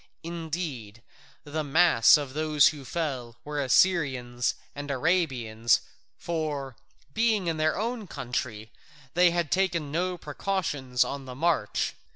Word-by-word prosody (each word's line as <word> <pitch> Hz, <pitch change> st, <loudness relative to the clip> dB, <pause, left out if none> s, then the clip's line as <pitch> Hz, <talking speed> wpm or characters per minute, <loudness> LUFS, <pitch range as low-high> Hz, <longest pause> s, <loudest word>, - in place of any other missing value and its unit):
Indeed, 160 Hz, -, -5 dB, 0.4 s
the 155 Hz, +1 st, -3 dB
mass 150 Hz, -5 st, +6 dB
of 140 Hz, -3 st, -5 dB
those 155 Hz, -1 st, +4 dB
who 145 Hz, -3 st, -8 dB
fell 130 Hz, -6 st, -4 dB
were 150 Hz, -1 st, -2 dB
Assyrians 130 Hz, -6 st, +2 dB, 0.2 s
and 145 Hz, 0 st, -7 dB
Arabians, 125 Hz, -7 st, +1 dB, 0.4 s
for, 150 Hz, -6 st, -3 dB, 0.4 s
being 220 Hz, -4 st, +2 dB
in 165 Hz, -2 st, -1 dB
their 155 Hz, 0 st, +1 dB
own 230 Hz, -1 st, -3 dB
country, 120 Hz, -5 st, -4 dB, 0.4 s
they 180 Hz, +1 st, +5 dB
had 170 Hz, -3 st, -1 dB
taken 175 Hz, -6 st, 0 dB
no 180 Hz, +3 st, -1 dB
precautions 150 Hz, -6 st, -1 dB
on 140 Hz, -1 st, -5 dB
the 125 Hz, -1 st, -8 dB
march. 150 Hz, -7 st, 0 dB
150 Hz, 125 wpm, -27 LUFS, 130-170 Hz, 0.4 s, mass